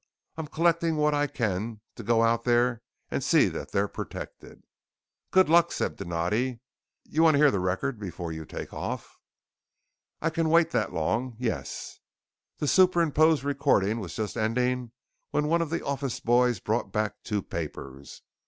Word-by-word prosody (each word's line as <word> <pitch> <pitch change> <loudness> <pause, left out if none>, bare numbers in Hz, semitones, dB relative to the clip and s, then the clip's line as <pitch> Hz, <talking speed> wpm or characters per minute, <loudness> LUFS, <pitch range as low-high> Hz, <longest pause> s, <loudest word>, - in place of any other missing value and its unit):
I'm 160 -1 -5
collecting 165 +1 +1
what 150 0 +2
I 145 0 +1
can 110 -2 -2
to - - -9
go 115 +2 +2
out 115 0 +2
there 120 -1 +2 0.3
and - - -1
see - - +4
that - - -6
they're 100 +1 +1
protected!" - - -8 0.7
"Good 185 0 +5
luck," 170 +2 +5
said - - -2
Donatti. 105 +9 -1 0.5
"Y'wanna 160 -1 +4
hear 145 -1 +6
the 100 - 0
record 95 +8 -1
before 90 -4 -5
you 80 0 -6
take 75 - -8
off?" - - -5 1.0
"I 165 - 0
can 165 0 0
wait 165 0 +4
that 110 -5 0
long. 115 +10 -1
Yes!" 120 -2 -4 0.6
The 150 - -2
superimposed 165 -4 +4
recording 115 -7 +1
was 95 -6 -6
just 110 -2 -3
ending 125 +2 0 0.4
when 150 0 0
one 170 +2 +2
of 165 - -2
the 165 - -3
office 140 -2 -2
boys 120 -2 +3
brought 110 +5 -1
back 110 -2 -2
two 105 -3 -2
papers. 70 -4 -7
125 Hz, 155 wpm, -27 LUFS, 105-150 Hz, 1.0 s, hear